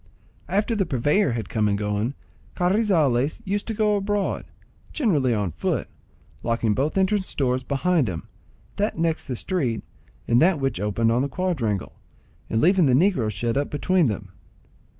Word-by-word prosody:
After 210 +4 +1
the 195 -4 0
purveyor 145 - +2
had 115 -5 -3
come 105 +2 0
and 100 -1 +1
gone, 105 +5 -1 0.4
Carrizales 175 - +2
used 200 +2 -2
to 225 - -3
go 210 -1 +2
abroad, 205 0 -1 0.5
generally 160 - +1
on 105 -6 0
foot, - - -2 0.5
locking 115 -2 0
both 145 - -1
entrance 190 0 +1
doors 130 -2 +1
behind 140 - +1
him—that 165 - -6
next 165 -1 0
the 125 - -3
street, 120 - -2 0.4
and 120 +1 +4
that 170 -1 +4
which 135 -8 -1
opened 105 +3 +1
on 120 +2 +2
the 140 - -1
quadrangle,—and 120 - -4
leaving 180 - +4
the 130 - +3
negro 160 - +2
shut 115 +3 -2
up 145 - 0
between 175 +2 +2
them. 105 -2 -4
140 Hz, 150 wpm, -24 LUFS, 115-185 Hz, 0.5 s, and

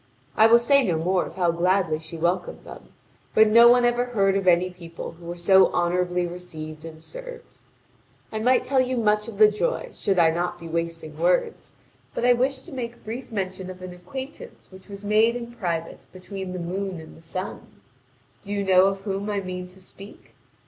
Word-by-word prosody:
I 220 - +6
will 230 +1 +7
say 275 +4 +4
no 175 -8 0
more 180 +3 0
of - - -12
how 175 -2 +2
gladly 175 -2 +1
she 160 +1 -9
welcomed 175 +2 -1
them, - - -12 0.5
but 220 0 +7
no 235 +2 +8
one 245 0 +5
ever 240 0 +2
heard 200 -5 +1
of 195 -1 -1
any 180 +1 +4
people 170 -2 -9
who 170 +1 -15
were 175 +1 -5
so 190 +2 +5
honourably 180 0 0
received 160 -3 -8
and 160 -1 -10
served. - - -11 0.7
I 220 - -3
might 250 +3 +3
tell 270 -1 +3
you 255 0 -1
much 210 -1 +1
of 225 -3 -8
the 215 0 +8
joy - - -2
should 195 -2 -1
I 165 -2 +5
not 175 +2 -2
be 165 - -9
wasting 165 -2 -4
words, 175 +2 0 0.4
but - - -1
I 245 - +6
wish 260 +2 -1
to 350 - -13
make 240 -3 -6
brief 235 +4 -6
mention 190 -3 -4
of 185 0 -9
an 180 -1 -7
acquaintance 265 - -9
which 190 +2 -15
was 200 0 -9
made 215 +3 +3
in 235 -1 -6
private 170 -7 -4
between 185 0 -7
the - - -4
moon 185 +1 -4
and 160 - -12
the - - -16
sun. 185 +4 -7 0.6
Do 200 - -9
you 200 -1 -1
know 190 -1 +5
of 195 0 -2
whom 200 0 -3
I 205 -1 -1
mean 180 -1 -6
to 185 +1 -17
speak? 195 +2 -14
190 Hz, 205 wpm, -24 LUFS, 175-225 Hz, 0.7 s, no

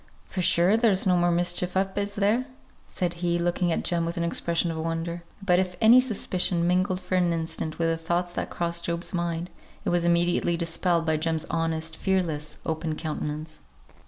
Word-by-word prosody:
For 185 - -4
sure, 180 +4 +5
there's 215 -5 +3
no 185 -1 +4
more 175 0 +3
mischief 175 +1 +1
up, 190 0 0
is 205 0 -2
there?" 210 +5 +2 0.4
said 175 -2 -2
he, 175 -1 +1
looking 175 0 0
at - - -1
Jem 170 -1 +1
with 170 +2 -3
an 170 - 0
expression 170 0 0
of 160 - -5
wonder. 165 +1 -3 0.2
But 180 -2 +4
if 185 -1 -1
any 235 +3 +7
suspicion 185 -7 -1
mingled 185 +1 +1
for 185 0 -7
an 180 -2 +3
instant 160 -1 -3
with 165 - +1
the 165 0 +1
thoughts 175 +1 -1
that - - -3
crossed 170 0 -2
Job's 170 +2 -1
mind, 170 0 -2 0.3
it - - +1
was 175 -1 +1
immediately 170 0 +2
dispelled 170 0 0
by 160 -1 +1
Jem's 160 0 0
honest, 160 -1 -2
fearless, 160 -6 -1
open 160 0 -2
countenance. 155 0 -5
170 Hz, 190 wpm, -26 LUFS, 165-180 Hz, 0.4 s, any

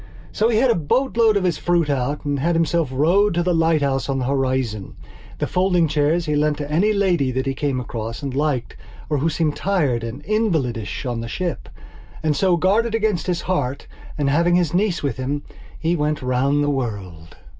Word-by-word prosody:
So 220 +2 +1
he 225 - +2
had 250 +2 +4
a - - +4
boatload 225 - +2
of 195 - -1
his 180 -3 0
fruit 175 -3 +1
out 140 +1 -1
and 145 -1 -1
had 170 +5 +1
himself 165 -2 +1
rowed 170 +9 +3
to 175 - +1
the 180 0 +1
lighthouse 155 -5 +1
on 135 - 0
the 130 - -1
horizon. 130 -6 -1 0.4
The - - -1
folding 180 -2 +2
chairs 155 +3 +1
he 150 -2 0
lent 150 0 +1
to 145 0 -5
any 190 +8 +3
lady 180 -9 +1
that 130 +1 -2
he 135 - -1
came 135 -1 -1
across 115 0 -5
and 135 -2 -3
liked 135 -5 -1 0.4
or 150 - +2
who 160 +5 +1
seemed 155 -2 0
tired 145 -12 0
and 115 +5 -6
invalidish 150 - -1
on 120 -2 -2
the 115 - -5
ship. 175 +8 -4 0.5
And 155 -2 +1
so, 180 +4 +2
guarded 215 +6 +2
against 215 -6 0
his 180 -2 0
heart 140 -8 -2 0.3
and, 145 -2 0
having 170 +5 +3
his 175 -3 +1
niece 180 -3 +1
with 140 - -1
him, 140 +3 -3 0.3
he 165 +2 0
went 150 -3 -1
round 135 +3 +1
the 145 - +1
world.... 100 - -5
150 Hz, 200 wpm, -21 LUFS, 135-175 Hz, 0.5 s, had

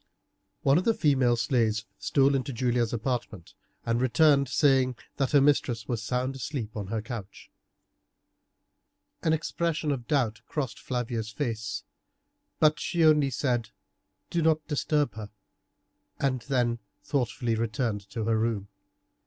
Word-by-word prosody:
One 140 +4 +5
of - - -2
the 225 +2 +2
female 130 -6 +3
slaves 115 -2 +1
stole 140 0 +3
into 135 +1 -1
Julia's 120 -1 0
apartment, 115 -6 -3 0.3
and 115 +1 +1
returned 140 +2 +4
saying 130 -1 +3 0.2
that 135 -2 +1
her 145 - +5
mistress 125 -6 +2
was 120 -3 -2
sound 125 +4 -1
asleep 130 -5 -5
on 105 -3 -4
her 110 +1 -3
couch. 115 -5 -8 1.7
An 160 - +1
expression 160 0 -1
of 125 -4 -4
doubt 120 -7 0
crossed 135 -6 -3
Flavia's 120 -3 -3
face, 110 -3 -3 0.8
but 155 -1 +4
she 170 -2 +1
only 150 -3 +5
said, 120 -4 -1 0.6
"Do 170 - +1
not 155 -1 +2
disturb 150 -2 0
her," 105 -1 -7 0.9
and 130 -3 0
then 120 -3 +1 0.2
thoughtfully 120 -4 -1
returned 110 -2 -2
to 115 +1 -4
her 110 0 +2
room. 110 -3 -1
125 Hz, 135 wpm, -28 LUFS, 115-145 Hz, 1.7 s, One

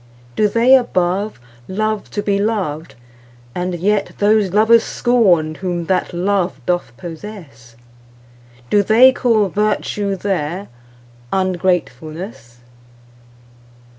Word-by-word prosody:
Do 210 - +3
they 235 +5 +3
above 195 - 0 0.3
love 215 +2 -2
to 205 - -4
be 200 -1 0
loved, 190 -8 -2 0.6
and 180 0 -3
yetThose 205 +2 +1
lovers 220 +3 +5
scorn 185 -11 +2
whom 175 0 -4
that 185 +1 0
love 185 +1 -1
doth 175 -5 -1
possess? 165 - -10 1.0
Do 205 - +5
they 230 +6 +6
call 225 -6 +1
'virtue' 205 0 -1
there—ungratefulness? 155 - -4
190 Hz, 90 wpm, -18 LUFS, 165-210 Hz, 1.0 s, they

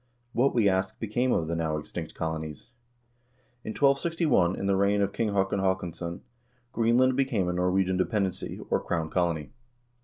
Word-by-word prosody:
What, 130 +3 +2
we 110 -4 +4
ask, 95 0 0
became 120 +4 0
of 80 - +1
the 85 - -1
now 80 -2 -1
extinct 75 - -6
colonics? 80 +4 -5 0.9
In - - -6
1261, 140 - +2
in - - -4
the 100 0 +2
reign 100 +1 +2
of 100 0 0
King 115 -2 0
Haakon 100 0 +1
HaakonsBon, 90 -2 -2 0.5
Greenland 120 +3 +3
became 130 -9 +1
a 90 - 0
Norwegian 90 +1 +1
dependency, 95 -1 -1
or - - +3
crown 80 -2 -2
colony. 85 -4 0
95 Hz, 155 wpm, -28 LUFS, 85-115 Hz, 0.9 s, we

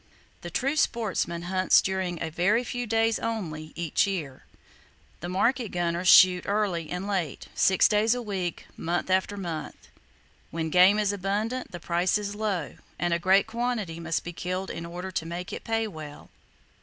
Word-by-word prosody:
The - - -6
true 275 +3 0
sportsman 195 - 0
hunts 185 +1 +4
during 190 -3 -2
a 160 - -4
very 200 +9 +2
few 245 0 -4
days 225 0 +2
only 160 -9 -4
each 170 +3 +1
year. 155 -9 -4 0.7
The 175 - -5
market 235 +5 +1
gunners 175 +1 -1
shoot 180 -1 +7
early 200 -6 0
and 180 +2 -4
late, 180 -8 -3
six 190 -1 +4
days 220 +3 +3
a 245 - -3
week, 190 -5 -4
month 175 +2 -2
after 190 +2 +1
month. 165 -6 -6 0.6
When 160 -1 -3
game 185 +4 +6
is 205 -1 +1
abundant, 210 +6 -2
the 175 - -7
price 175 +3 +1
is 205 -1 -4
low, 205 -7 -3 0.2
and 175 -1 0
a 170 - +1
great 190 +3 +4
quantity 225 -7 -3
must 165 -1 -2
be 175 - -6
killed 185 +3 -3
in 170 - -6
order 180 +2 -6
to 170 - -2
make 175 +2 -5
it - - -6
pay 225 -1 0
well. 155 -6 -10
185 Hz, 170 wpm, -27 LUFS, 170-210 Hz, 0.7 s, shoot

